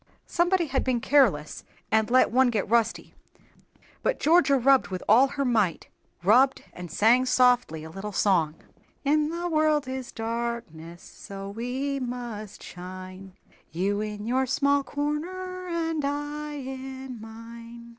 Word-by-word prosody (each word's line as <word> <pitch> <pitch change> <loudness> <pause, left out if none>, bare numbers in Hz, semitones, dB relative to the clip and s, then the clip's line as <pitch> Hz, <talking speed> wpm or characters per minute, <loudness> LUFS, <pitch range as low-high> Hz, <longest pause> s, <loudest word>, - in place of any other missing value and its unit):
Somebody 350 0 +1
had 270 -3 -1
been 255 -2 0
careless 230 - +2 0.3
and 220 0 +2
let 255 -1 +4
one 260 +1 +4
get 215 -5 -1
rusty, 230 +1 0 0.9
but - - 0
Georgia 310 -4 +4
rubbed 265 +1 +4
with 185 -1 -5
all 245 +6 +6
her 275 0 -3
might, 215 -9 0 0.3
rubbed, 255 +8 +4
and 180 -1 -8
sang 240 +7 +4
softly 245 -11 +3
a 160 - -8
little 195 +4 -6
song: 170 -7 +2 0.5
"In 300 +1 +2
the 340 +2 -3
world 310 -3 +2
is 260 -1 -5
darkness, 225 -8 -5
So 195 0 -9
we 260 +6 -3
must 240 -5 -6
shine, 185 +1 -9 0.4
You 195 +5 -1
in 210 -1 -5
your 260 +3 +1
small 280 +2 +2
corner, 365 +6 -4
And 325 -3 -2
I 290 +1 -3
in 265 -3 -7
mine." 230 +1 -11
250 Hz, 135 wpm, -26 LUFS, 210-280 Hz, 0.9 s, all